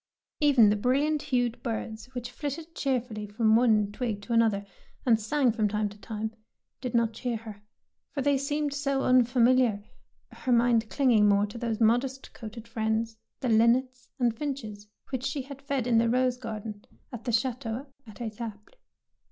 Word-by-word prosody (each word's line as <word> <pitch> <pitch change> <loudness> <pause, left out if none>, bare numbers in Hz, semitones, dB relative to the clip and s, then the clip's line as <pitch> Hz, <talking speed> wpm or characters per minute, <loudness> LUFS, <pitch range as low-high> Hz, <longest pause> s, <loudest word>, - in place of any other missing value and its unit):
Even 265 -8 +6
the - - +2
brilliant 280 +7 +1
hued 245 -4 0
birds 225 -2 -4
which 245 -1 -5
flitted 315 +3 -5
cheerfully 245 -8 -2
from 220 +1 +3
one 215 -4 +3
twig 220 -2 -3
to 235 - -3
an 230 - +6
other, 205 -3 +1 0.4
and 230 -3 +4
sang 250 +3 +2
from 215 -1 +1
time 210 0 -1
to 205 - -13
time, 220 +2 -4 0.5
did 250 -2 -3
not 230 -1 +2
cheer 240 +1 -3
her, 215 -2 -10 0.5
for 280 - -3
they 285 0 +3
seemed 290 +1 -1
so 275 -1 0
un 255 0 +5
familiar, 245 -3 +3 0.5
her 255 - -3
mind 235 -2 +3
clinging 235 -7 +4
more 200 0 +4
to 210 +3 -8
those 230 -2 -2
modest 245 +4 +1
coated 225 0 -9
friends, 225 0 -1 0.3
the 255 - 0
linnets 245 +3 +3
and 240 -4 +1
flnches, 220 -7 -5 0.2
which 260 -2 -2
she 270 0 -2
had 275 +1 -10
fed 275 -3 -2
in 235 -2 +4
the 230 0 +2
rose 250 +1 +2
garden 215 -3 -6 0.3
at 235 -2 -7
the 240 - 0
chateau 235 +1 -1 0.2
at 215 - -11
Etaples. 220 -2 -6
235 Hz, 175 wpm, -28 LUFS, 220-260 Hz, 0.5 s, Even